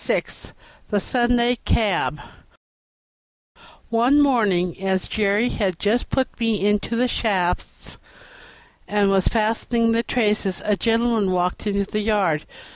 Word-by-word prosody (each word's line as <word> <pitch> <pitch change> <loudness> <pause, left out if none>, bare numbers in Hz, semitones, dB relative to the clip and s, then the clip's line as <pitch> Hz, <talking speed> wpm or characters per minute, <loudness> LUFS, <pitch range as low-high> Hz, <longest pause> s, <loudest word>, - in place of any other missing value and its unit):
36 - - -3 0.4
The 205 - +1
Sunday 240 +2 +1
Cab 195 -7 0 1.7
One 240 +5 +3
morning, 200 - +1
as 190 -1 -1
Jerry 210 +3 +1
had 190 -7 -2
just 215 +7 0
put 260 -2 -2
me 225 -4 0
into 210 +2 0
the 250 +2 +2
shafts 190 -7 -2 0.9
and 205 -1 +2
was 195 -1 +2
fastening 230 +1 +1
the 230 0 +2
traces, 210 -5 0
a 210 - +2
gentleman 225 -1 +1
walked 180 +3 -1
into 200 -1 0
the 210 +2 -3
yard. 200 -8 0
210 Hz, 120 wpm, -22 LUFS, 195-235 Hz, 1.7 s, One